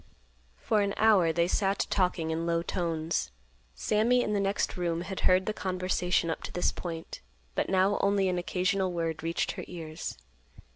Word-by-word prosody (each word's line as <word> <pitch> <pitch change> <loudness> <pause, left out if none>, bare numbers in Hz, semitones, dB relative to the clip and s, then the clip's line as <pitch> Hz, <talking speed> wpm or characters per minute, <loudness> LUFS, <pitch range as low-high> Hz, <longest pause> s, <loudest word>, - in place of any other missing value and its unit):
For 210 - +1
an 200 0 0
hour 205 -7 +5
they 170 +1 +2
sat 195 +1 +1
talking 180 -4 +1
in 165 +1 -2
low 170 0 +1
tones. 165 -2 -1 0.5
Sammy 235 +4 +2
in 210 - -1
the 205 - +1
next 195 0 0
room 170 -2 -1
had 190 +1 -5
heard 185 +1 +4
the 215 - -1
conversation 185 -3 0
up - - -4
to - - -6
this 180 - +1
point, 165 -2 -6 0.3
but - - -1
now 190 +2 +3
only 200 -1 +2
an 180 -1 0
occasional 185 +1 0
word 165 -2 -2
reached 165 +1 -1
her - - -6
ears. 160 - -6
180 Hz, 175 wpm, -29 LUFS, 165-195 Hz, 0.5 s, hour